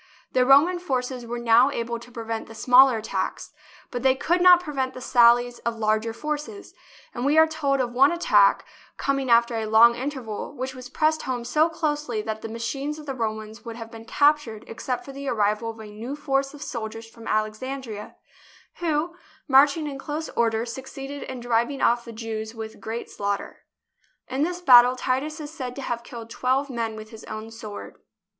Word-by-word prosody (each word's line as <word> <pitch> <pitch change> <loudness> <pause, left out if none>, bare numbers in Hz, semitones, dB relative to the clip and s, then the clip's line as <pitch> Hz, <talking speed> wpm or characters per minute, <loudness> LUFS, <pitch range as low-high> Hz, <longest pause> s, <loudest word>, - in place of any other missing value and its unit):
The 255 -1 +2
Roman 310 +7 +6
forces 255 -6 -3
were 240 +1 -4
now 235 +2 +5
able 235 -3 -3
to 245 - -14
pre 230 -1 -7
vent 225 0 -4
the 225 - -12
smaller 250 +2 +6
attacks, 220 - -4 0.4
but 245 - -3
they 260 0 +4
could 350 +6 0
not 360 -1 +8
prevent 275 -6 -3
the - - -6
sallies 245 -1 +4
of 235 -1 -3
larger 215 +1 0
forces, 300 - -5 0.4
and 240 - -4
we 290 +3 +2
are 320 - +8
told 295 -4 -1
of 245 -2 -1
one 270 +5 +5
attack, 210 - +4 0.3
coming 275 -2 -1
after 235 0 +4
a 220 -1 -2
long 225 +2 +7
interval, 260 -1 -5
which 260 +1 -4
was 255 -1 -10
pressed 310 +3 +1
home 245 -2 -3
so 310 +6 +2
closely 295 -7 -2
that 220 0 -4
the 225 - -6
machines 270 +6 -4
of 305 - -10
the 275 - -3
Romans 220 -2 -4
would 230 -1 -7
have 225 -1 -9
been 225 -1 -11
captured 285 -5 +2
except 245 +2 -4
for 275 - -8
the 275 +1 -7
arrival 215 -1 0
of 225 0 -8
a 220 - -8
new 220 +6 -7
force 275 -1 -1
of 295 - -8
soldiers 225 -3 -6
from 230 0 -13
Alexandria, 215 +1 -3 0.6
who, 335 0 -1 0.3
marching 285 +3 +5
in 280 -2 -5
close 305 +3 -4
order, 230 -1 0
succeeded 270 +3 -7
in 260 -1 -6
driving 240 +3 0
off 235 0 +2
the 230 - -8
Jews 220 0 -5
with 220 -1 -8
great 230 +2 -5
slaughter. 200 0 -4 0.6
In 260 +2 -3
this 350 +3 -1
battle 250 -5 +7
Titus 270 +5 -2
is 295 -1 -7
said 255 -5 -6
to 275 - -6
have 235 -2 -3
killed 230 -1 -9
twelve 265 +3 0
men 230 -2 -3
with 215 0 -10
his 220 -1 -11
own 215 +1 -7
sword. 215 -2 -9
245 Hz, 190 wpm, -24 LUFS, 225-280 Hz, 0.6 s, not